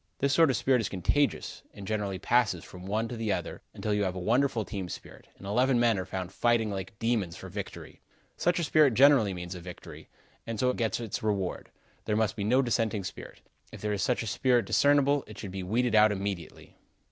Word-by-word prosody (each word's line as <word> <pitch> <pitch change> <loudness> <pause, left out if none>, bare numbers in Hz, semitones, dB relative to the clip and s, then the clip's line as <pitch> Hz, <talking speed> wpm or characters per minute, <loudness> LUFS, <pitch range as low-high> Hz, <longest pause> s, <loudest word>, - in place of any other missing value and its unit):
This 140 0 +1
sort 165 -3 +5
of 130 - +1
spirit 130 -3 +2
is 105 - -3
contagious, 115 +10 0
and 100 - -9
generally 105 -2 -2
passes 110 -3 +1
from 90 +1 -11
one 110 +3 -1
to 120 - -6
the 110 -2 -2
other, - - -3
until 105 - -3
you 105 0 +1
have 95 -2 -2
a - - -4
wonderful 115 +3 +1
team 95 -4 -5
spirit, - - -10
and - - -12
eleven 125 +5 +2
men 115 -4 +3
are 95 - -5
found 95 -1 -5
fighting 115 0 +1
like 100 +2 -6
demons 110 -7 -1
for - - -9
victory. - - -8 0.3
Such 175 - +1
a 170 - 0
spirit 150 -5 +4
generally 135 -6 +6
means 90 0 -6
a 90 - -7
victory, 90 +1 -11 0.4
and 115 -2 -4
so 125 +2 +2
gets 115 -2 -1
its 115 -4 -4
reward. 100 -4 -2 0.4
There 105 - 0
must 110 -2 +1
be 105 - -3
no 125 +6 +3
dissenting 110 -3 0
spirit. - - -9 0.3
If - - -10
there 105 0 -1
is 100 - -2
such 125 -2 0
a - - -6
spirit 120 +2 +2
discernible, 145 0 +3
it 105 -1 -11
should 100 -3 -7
be 95 0 -5
weeded 115 +6 0
out 110 0 +6
immediately. 95 -4 -5
110 Hz, 215 wpm, -29 LUFS, 95-125 Hz, 0.4 s, generally